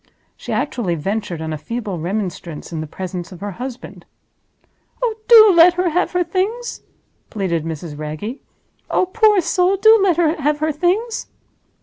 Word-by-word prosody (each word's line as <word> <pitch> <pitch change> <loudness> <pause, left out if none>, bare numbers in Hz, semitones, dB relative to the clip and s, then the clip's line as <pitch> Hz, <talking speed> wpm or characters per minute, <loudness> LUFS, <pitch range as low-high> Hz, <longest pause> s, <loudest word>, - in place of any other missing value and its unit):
She - - -8
actually 185 -9 -1
ventured 190 0 -3
on 160 0 -4
a 155 - -5
feeble 210 -1 -5
remonstrance 175 -3 -5
in 160 - -3
the 155 - -6
presence 180 +2 -6
of 180 - -11
her 205 0 -4
husband. 255 -1 -8 1.0
"Oh, 485 -3 0
do 440 -3 +9
let 340 +1 +7
her 360 0 +1
have 355 +3 0
her 360 0 +2
Things!" 395 +8 -3 0.5
pleaded 175 -7 -2
Mrs. 160 -1 -6
Wragge. 155 - -6 0.5
"Oh, - - +2
poor 425 +1 +3
soul, 365 +3 +1
do 440 +3 +6
let 370 -4 +2
her 320 -2 +1
have 295 +1 +1
her 310 +1 0
Things!" 375 +10 -1
265 Hz, 160 wpm, -19 LUFS, -, 1.0 s, do